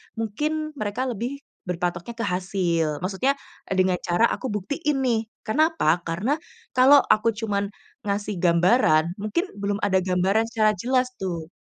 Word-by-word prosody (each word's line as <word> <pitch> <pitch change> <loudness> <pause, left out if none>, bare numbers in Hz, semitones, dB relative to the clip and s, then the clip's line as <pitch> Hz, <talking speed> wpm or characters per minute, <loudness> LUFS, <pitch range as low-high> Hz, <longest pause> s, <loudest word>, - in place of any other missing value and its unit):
mungkin 300 +8 -2
mereka 215 +4 -2
lebih 245 +6 -5 0.2
berpatoknya 175 +2 -3
ke 230 - -3
hasil, 180 -4 0
maksudnya, 205 +9 +1 0.3
eee, 195 - -2
dengan 185 -1 +3
cara 175 +5 +1
aku 260 - -3
buktiin 270 +8 -1
nih, 235 -3 +2 0.3
Karena 310 +9 +3
apa? 165 - +3
Karena 190 - 0 0.4
kalau 265 +3 +8
aku 230 +2 +3
cuman 205 -2 -1 0.4
ngasih 205 +1 -1
gambaran, 170 -1 +3
mungkin 215 - -1
belum 200 0 -1
ada 190 -2 +3
gambaran 190 +4 +1
secara 220 -2 +2
jelas 255 +6 +1
tuh. 170 -4 -4
205 Hz, 145 wpm, -24 LUFS, 180-245 Hz, 0.4 s, kalau